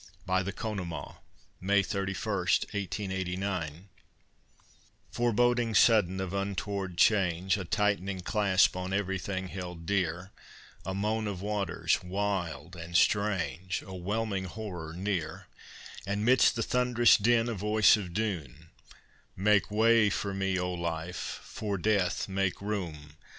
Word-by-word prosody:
BY 95 0 +2
THE 95 +2 -3
CONEMAUGH 95 -5 -5 0.4
[May 100 +2 +3
31, 100 +1 -2 0.4
1889] 95 -3 -3 1.2
Foreboding 120 -1 +2
sudden 100 -5 +4
of 95 -1 -3
untoward 100 -2 -3
change, 95 -2 +3
A 100 -3 -4
tight'ning 100 -1 0
clasp 100 -1 +3
on 90 +1 -4
everything 95 -1 -2
held 90 -3 -7
dear, 95 -1 -1 0.6
A 95 - -2
moan 110 +2 -1
of 100 -2 -5
waters 100 -4 0
wild 90 -2 -3
and 85 0 -2
strange, 95 -5 +1
A 95 - -10
whelming 100 +1 -2
horror 90 -5 -6
near; 90 -4 -3 0.6
And, 100 +2 -1
'midst 130 -1 +5
the 115 - 0
thund'rous 125 -1 +4
din 115 +2 +3
a 120 - -1
voice 105 +2 +4
of 100 -5 -5
doom, 85 - -4 0.6
"Make 100 -1 +3
way 110 0 +4
for 100 0 -2
me, 95 -1 0
O 90 0 -1
Life, 85 0 -4
for 105 -2 -4
Death 95 -2 +1
make 95 -1 -1
room! 85 -8 -5
95 Hz, 125 wpm, -29 LUFS, 90-105 Hz, 1.2 s, midst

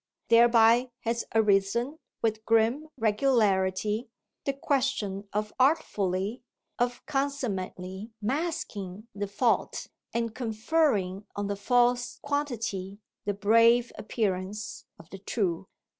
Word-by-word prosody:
Thereby 235 +1 +6
has 230 0 -1
arisen 220 +7 +2 0.2
with 220 -1 0
grim 230 +8 +2
regularity 210 -2 +1 0.4
the 275 - +1
question 260 -8 -1
of 210 +1 -2
artfully, 210 - +1 0.4
of 245 0 -1
consummately 215 -9 -3
masking 215 - -3
the 205 0 -3
fault 230 +4 0 0.3
and 230 -1 -1
conferring 220 - 0
on 205 - -2
the 200 0 -2
false 245 +3 +2
quantity 230 -10 -2 0.3
the 205 -1 -1
brave 230 +4 +4
appearance 210 0 -3
of 165 - -15
the 195 - -8
true. 190 -3 -2
220 Hz, 100 wpm, -28 LUFS, 200-245 Hz, 0.4 s, Thereby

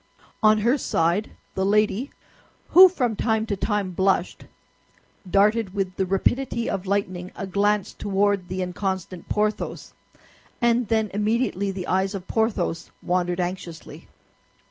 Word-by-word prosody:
On 215 0 +5
her 235 +7 +2
side 170 +3 0 0.2
the 190 - -1
lady, 210 +5 +1 0.6
who 370 +2 +9
from 250 -10 -1
time 220 0 0
to 215 -2 -2
time 205 -1 -1
blushed, 190 0 0 0.8
darted 205 +1 +2
with 190 -2 -2
the 190 - -1
rapidity 235 +5 0
of 195 0 -3
lightning 185 -2 -2
a 200 - -5
glance 205 +1 0
toward 200 -2 0
the 185 +1 -3
inconstant 185 -1 -4
Porthos; 210 0 -2 0.7
and 235 -1 +2
then 220 -1 0
immediately 210 -1 0
the 190 -2 -4
eyes 190 +2 0
of 190 -1 -7
Porthos 205 -7 -1
wandered 180 0 0
anxiously. 175 -2 -6
200 Hz, 130 wpm, -24 LUFS, 185-215 Hz, 0.8 s, who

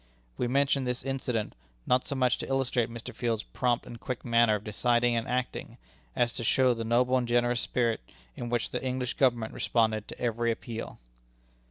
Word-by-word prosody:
We 125 - -1
mention 140 +1 +2
this 125 -1 -2
little 135 - -2
incident, 125 -5 -2 0.3
not 125 0 +2
so 140 - -3
much 125 -2 +2
to - - -4
illustrate 130 -3 +1
Mr. 115 -1 -7
Field's 115 -3 -1
prompt 125 -1 0
and 115 - -9
quick 130 +1 -5
manner 115 -2 +4
of 105 - -5
deciding 120 +3 +2
and 115 0 -1
acting, 125 +1 -3 0.4
as 120 -1 +2
to - - -4
show 130 +2 +4
the 115 -1 -4
noble 125 +3 +3
and 125 -1 -1
generous 120 0 +2
spirit 115 -2 0 0.3
in 120 - -5
which 120 0 -1
the - - -3
English 130 -1 -1
Government 120 -4 +1
responded 110 -2 +1
to - - -9
every 120 0 +1
appeal. 115 0 -6
120 Hz, 190 wpm, -29 LUFS, 115-125 Hz, 0.4 s, manner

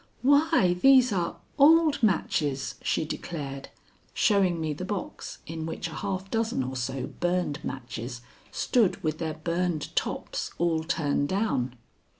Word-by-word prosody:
"Why, 285 - +4
these 260 -4 +6
are 175 -2 -1 0.2
old 310 0 +6
matches!" 150 - +1
she - - 0
declared, 140 -4 -5 0.5
showing 190 -5 +3
me 155 -1 -1
the 150 - -6
box 195 0 -5
in 160 0 -5
which 165 +2 -4
a - - -9
half 195 +2 -4
dozen 225 - 0
or 130 +1 -5
so 130 +1 -2
burned 175 -3 -2
matches 120 -1 -6 0.3
stood 230 -7 +1
with 155 -1 -1
their 160 -2 -2
burned 170 0 -2
tops - - -2
all 165 -2 +1
turned 145 -3 0
down. 185 - 0
170 Hz, 140 wpm, -27 LUFS, 145-200 Hz, 0.5 s, these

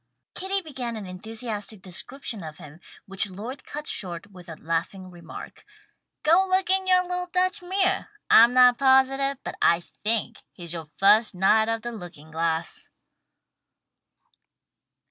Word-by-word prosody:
Kitty 385 +1 -2
began 255 -7 -5
an 215 -2 -6
enthusiastic 215 +1 -4
description 215 +3 -6
of 155 -1 -8
him, 150 +3 -13 0.3
which 195 +1 +2
Lloyd 230 +9 -8
cut 300 +1 -6
short 180 - -2
with 180 -2 -14
the 160 -2 -9
laughing 170 +3 -3
remark, 170 -2 -11 0.6
"Go 335 +5 +5
look 375 0 +2
in 380 0 +2
your 365 -1 +5
little 360 0 -3
Dutch 365 0 +1
mirror. 380 +1 0 0.2
I'm 235 +2 +7
not 250 -1 +6
positive, 270 +1 +3
but - - -6
I 170 0 +4 0.2
think 220 +1 0 0.2
he's 170 -2 -8
yoah 165 -3 -7
first 210 +2 +4
'Knight 220 +4 +3
of 225 0 -2
the 240 - -4
Looking 175 -8 -11
glass.'" 165 0 -3
220 Hz, 145 wpm, -25 LUFS, 180-275 Hz, 0.6 s, I'm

